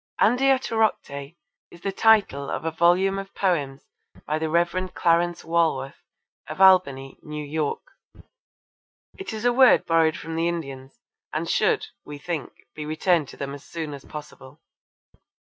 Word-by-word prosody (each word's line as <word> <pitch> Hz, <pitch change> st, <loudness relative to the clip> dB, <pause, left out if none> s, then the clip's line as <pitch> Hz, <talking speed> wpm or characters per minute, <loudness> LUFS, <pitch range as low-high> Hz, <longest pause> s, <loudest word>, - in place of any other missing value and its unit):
Andiatorocte 225 Hz, -, +1 dB, 0.3 s
is 170 Hz, -, -16 dB
the 195 Hz, -, -2 dB
title 200 Hz, -10 st, +3 dB
of -, -, -4 dB
a 165 Hz, -, 0 dB
volume 180 Hz, +4 st, +2 dB
of 195 Hz, 0 st, -9 dB
poems 145 Hz, -8 st, -1 dB, 0.4 s
by 155 Hz, +1 st, -1 dB
the 160 Hz, 0 st, -2 dB
Rev. 175 Hz, +3 st, 0 dB
Clarence 170 Hz, 0 st, +1 dB
Walworth, 160 Hz, -5 st, 0 dB, 0.5 s
of -, -, -7 dB
Albany, 140 Hz, -9 st, +4 dB
N.Y. 150 Hz, -, -6 dB, 1.0 s
It 385 Hz, -, -6 dB
is 220 Hz, +1 st, -5 dB
a 245 Hz, -, +4 dB
word 255 Hz, 0 st, +5 dB
borrowed 165 Hz, -1 st, +2 dB
from 165 Hz, 0 st, -7 dB
the 165 Hz, +1 st, 0 dB
Indians, 135 Hz, -, -6 dB, 0.3 s
and -, -, -3 dB
should, 440 Hz, -1 st, +1 dB, 0.2 s
we 150 Hz, 0 st, -9 dB
think, 165 Hz, 0 st, -5 dB, 0.2 s
be 155 Hz, -, -6 dB
returned 155 Hz, +1 st, +1 dB
to -, -, -12 dB
them 140 Hz, 0 st, -5 dB
as 140 Hz, -, -10 dB
soon 160 Hz, -3 st, -6 dB
as 140 Hz, -1 st, -9 dB
possible. 150 Hz, -1 st, -11 dB
165 Hz, 145 wpm, -24 LUFS, 145-190 Hz, 1.0 s, word